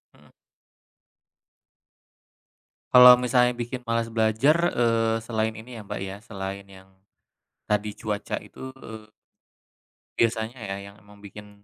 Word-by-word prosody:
Mhm. - - -22 2.6
Kalau 125 0 +10
misalnya 125 0 +2
bikin 120 +1 -6
malas 115 0 -1
belajar, 115 +10 +2
eee, 115 -1 +1
selain 110 -1 -2
ini 115 +2 -11
ya 105 - -10
Mbak - - -6
ya, 95 +1 -6
selain 100 -2 -6
yang 95 -1 -17 0.8
tadi 105 0 0
cuaca 105 -1 -4
itu, 130 +5 -11
eee 110 -1 -11 1.1
biasanya 115 +1 0
ya 100 -2 -5 0.2
yang 100 - -21
emang 105 0 -19
bikin 105 0 -13
110 Hz, 120 wpm, -25 LUFS, 105-120 Hz, 2.6 s, Kalau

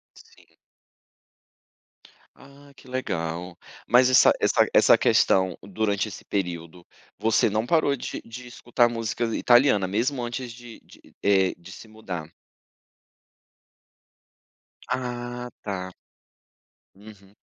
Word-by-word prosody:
Sim. - - -20 1.9
Ah, 140 +1 -17
que - - -18
legal. 90 -8 -4 0.3
Mas, 125 +1 +5
essa 130 - +6
essa - - +3
essa - - +6
questão, 95 -2 +2
durante 100 +1 -1
esse 100 - -10
período, 85 -3 -4 0.3
você 110 0 +2
não 110 +3 -1
parou 145 -2 +2
de 125 - -6
de 125 +2 -10
escutar 120 0 +1
música 115 0 -3
italiana, 120 -6 +4
mesmo, 120 +6 -1
antes 120 0 -5
de 120 -1 -12
de, - - -19 0.2
eh, 95 -2 +3
de 85 +2 -14
se 110 - -12
mudar. 90 -7 -7 2.6
Ah, 125 -1 -4
tá. 95 -2 -5 1.0
Uhum. 100 -1 -16
110 Hz, 105 wpm, -25 LUFS, 95-125 Hz, 2.6 s, essa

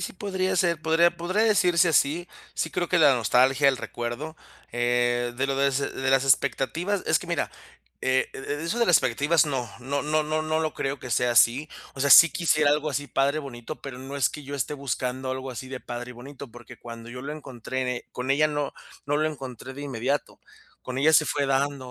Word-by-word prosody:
sí, - - -4
podría 190 -1 -2
ser. 170 -3 +1
Podría 165 +2 +3
podría 185 +6 0
decirse 180 -5 +3
así. 165 +3 +1 0.3
Sí 160 - -2
creo 175 -1 -2
que 180 - +2
la 145 -4 +6
nostalgia, 130 +4 +3
el 135 - +2
recuerdo, 120 +9 -5 0.4
eh, 120 0 +1
de 135 +1 0
lo 135 0 -1
des 140 -1 +2
de 135 -1 -2
las 135 0 +3
expectativas, 140 +9 +1
es 155 - +3
que 180 - -10
mira, 170 -3 -2 0.5
eh, 130 0 +1
e 145 +3 -5
eso 185 +8 -2
de 235 - +3
las 175 - +6
expectativas, 145 +5 +2
no 130 -5 -2
no 140 +3 -2
no 155 +1 +1
no 155 +1 -1
no 155 0 0
lo 155 -1 -2
creo 135 0 -3
que 125 - -9
sea 120 +2 +2
así. 120 +6 +4 0.3
O 135 - -8
sea, 140 +1 +2
sí 165 +4 +10
quisiera 155 -4 +2
algo 150 +1 0
así 145 +1 -3
padre, 140 +3 +1
bonito, 135 0 -8
pero 135 -3 -8
no 135 +2 -7
es 135 - +2
que 150 - -9
yo 140 +1 -7
esté 140 +2 -2
buscando 130 -1 -3
algo 130 0 -4
así 130 +1 -7
de 130 -1 -6
padre 120 +1 -7
y - - -8
bonito 135 +2 -11
porque 120 0 -13
cuando 115 0 -10
yo 125 +1 -8
lo 145 +2 -5
encontré 130 -3 -5
en 125 - -2
e 125 -1 -3
con 125 +2 -4
ella 150 +2 +3
no 145 -1 -2 0.3
no 145 +1 +1
lo 155 +1 +1
encontré 130 -3 -8
de 140 +2 -8
inmediato. 135 +1 -3 0.4
Con 130 +1 -5
ella 155 +3 +4
se 155 0 +5
fue 140 -1 0
dando, 135 -1 -1
140 Hz, 220 wpm, -25 LUFS, 130-155 Hz, 0.5 s, sí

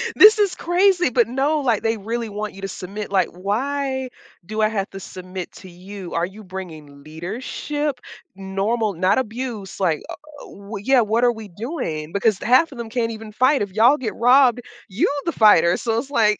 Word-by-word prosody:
This 430 +1 +8
is 405 -3 +2
crazy, 355 -2 +2
but 240 -2 +3
no, 275 +5 0
like, 235 -6 0
they 225 0 +1
really 230 +2 -4
want 210 0 -5
you 195 - -11
to - - -2
submit, 195 +2 -7
like, 190 -3 +2
"Why 265 +8 -2 0.3
do 215 +5 -6
I 215 - +3
have 200 -3 -2
to 195 - -9
submit 185 -1 -8
to 185 - -12
you? 185 +1 -9
Are 170 +1 +1
you 200 +4 -11
bringing 160 -7 -9
leadership, 245 - -4 0.4
normal, 195 +3 -1
not 185 +7 +2
abuse, 225 -4 -5
like, 165 -6 +1
uh, - - -5 0.3
w 200 0 -9
Yeah, 265 -1 +4
what 225 +2 +1
are 245 - +5
we 220 -2 -9
doing?" 175 - -5
Because 200 +1 +1
half 260 +7 +3
of 260 - -10
them 230 -1 -5
can't 230 -1 -1
even 220 -1 -8
fight. 260 +6 +3
If 205 -2 -3
y'all 235 +7 +5
get 235 -6 -4
robbed, 245 0 +4 0.3
you 195 +5 +1 0.2
the 335 - 0
fighter, 180 - +5
so 225 -1 -1
it's 265 +3 -6
like 215 -6 +2
215 Hz, 195 wpm, -21 LUFS, 195-255 Hz, 0.4 s, This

